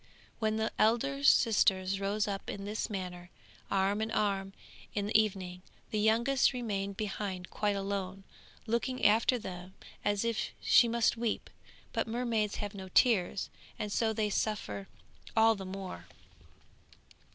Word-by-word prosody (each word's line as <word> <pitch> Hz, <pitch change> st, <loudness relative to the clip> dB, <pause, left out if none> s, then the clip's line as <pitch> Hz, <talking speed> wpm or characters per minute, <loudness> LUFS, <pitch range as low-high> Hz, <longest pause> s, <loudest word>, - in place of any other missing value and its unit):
When 215 Hz, -1 st, +1 dB
the 220 Hz, 0 st, 0 dB
elder 275 Hz, +6 st, +2 dB
sisters 195 Hz, -7 st, +4 dB
rose 205 Hz, +2 st, 0 dB
up 195 Hz, -1 st, -4 dB
in 200 Hz, 0 st, -5 dB
this 210 Hz, +1 st, -3 dB
manner, 180 Hz, -3 st, -5 dB, 0.4 s
arm 195 Hz, +2 st, +1 dB
in 220 Hz, -, -1 dB
arm, 195 Hz, -3 st, 0 dB, 0.4 s
in 205 Hz, -1 st, 0 dB
the 210 Hz, -, -4 dB
evening, 185 Hz, -4 st, -4 dB, 0.3 s
the 215 Hz, -, 0 dB
youngest 235 Hz, +6 st, +3 dB
remained 200 Hz, -5 st, -3 dB
behind 195 Hz, -3 st, -4 dB
quite 205 Hz, -1 st, 0 dB
alone, 195 Hz, -1 st, -3 dB, 0.4 s
looking 240 Hz, +3 st, -1 dB
after 225 Hz, +4 st, +4 dB
them 185 Hz, -3 st, -8 dB, 0.3 s
as 205 Hz, +1 st, +1 dB
if 230 Hz, -1 st, -2 dB
she 240 Hz, -, +6 dB
must 235 Hz, 0 st, +2 dB
weep; 230 Hz, -1 st, -2 dB, 0.4 s
but -, -, 0 dB
mermaids 225 Hz, -3 st, 0 dB
have 205 Hz, 0 st, -4 dB
no 190 Hz, -2 st, -8 dB
tears, 195 Hz, -3 st, +2 dB, 0.3 s
and 210 Hz, -, -4 dB
so 225 Hz, +1 st, +1 dB
they 215 Hz, -1 st, -1 dB
suffer 210 Hz, -2 st, -2 dB, 0.5 s
all 225 Hz, 0 st, +6 dB
the 195 Hz, -3 st, -7 dB
more. 185 Hz, -, -7 dB
210 Hz, 140 wpm, -31 LUFS, 195-225 Hz, 0.5 s, she